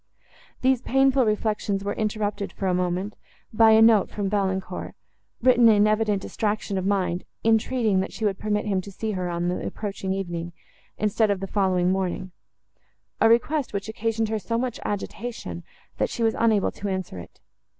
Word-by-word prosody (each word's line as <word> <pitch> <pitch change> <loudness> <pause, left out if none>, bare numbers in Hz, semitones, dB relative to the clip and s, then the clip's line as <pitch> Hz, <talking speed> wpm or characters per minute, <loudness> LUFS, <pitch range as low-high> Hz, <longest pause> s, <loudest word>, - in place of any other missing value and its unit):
These 260 -1 +3
painful 270 0 +3
reflections 210 -2 -1
were 200 0 -2
interrupted, 210 -2 -2
for 195 - -4
a 185 - +2
moment, 180 +3 -1 0.4
by 225 +1 +6
a 220 0 +7
note 225 -3 +5
from 200 -2 -3
Valancourt, 190 -2 -2 0.5
written 245 -2 +6
in 210 -1 +5
evident 215 -2 +1
distraction 205 -2 -2
of 190 - -2
mind, 185 -3 0 0.2
entreating, 225 -2 +2
that 190 - -2
she 220 - -4
would 200 -1 0
permit 210 0 -1
him 195 -3 0
to 200 - -10
see 220 +3 -3
her 185 -3 -2
on 175 0 -2
the 180 - -2
approaching 195 -2 -4
evening, 175 -3 -4 0.4
instead 215 +1 +1
of 200 -2 0
the 195 - -4
following 185 -2 +1
morning; 185 0 -2 0.9
a 225 - +5
request, 265 +4 +2
which 200 +1 -3
occasioned 225 0 -1
her 220 -1 -1
so 230 +4 -2
much 245 -1 -2
agitation, 205 - -5 0.4
that - - +1
she 235 - -3
was 225 -1 +3
unable 220 -3 +2
to 205 - -6
answer 185 - -4
it. 85 - -13
205 Hz, 175 wpm, -25 LUFS, 190-225 Hz, 0.9 s, a